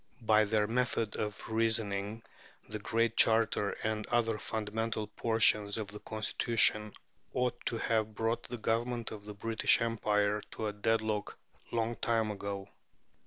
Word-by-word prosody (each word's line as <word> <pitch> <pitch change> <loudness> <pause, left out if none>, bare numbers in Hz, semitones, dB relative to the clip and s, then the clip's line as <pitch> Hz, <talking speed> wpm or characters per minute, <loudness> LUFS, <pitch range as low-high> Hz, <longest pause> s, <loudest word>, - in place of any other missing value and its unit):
By 110 -1 +4
their 105 0 +2
method 115 -1 0
of 105 -1 -4
reasoning 110 -1 0 0.4
the 110 0 -5
Great 115 +2 +1
Charter 110 -2 +4
and 110 -1 -1
other 115 -2 +1
fundamental 110 +1 -2
portions 105 -1 +2
of 105 -3 -3
the 105 +1 -8
Constitution 110 -1 +1 0.4
ought 125 -1 -1
to 115 - -1
have 110 -1 0
brought 115 +2 0
the 120 - -5
Government 115 +1 -1
of 105 -2 -8
the 105 0 -8
British 110 +2 +2
Empire 105 -2 +1
to 110 - -4
a 105 - -1
deadlock 110 0 0 0.3
long 115 0 0
ago. 100 -4 -1
110 Hz, 135 wpm, -32 LUFS, 105-115 Hz, 0.4 s, By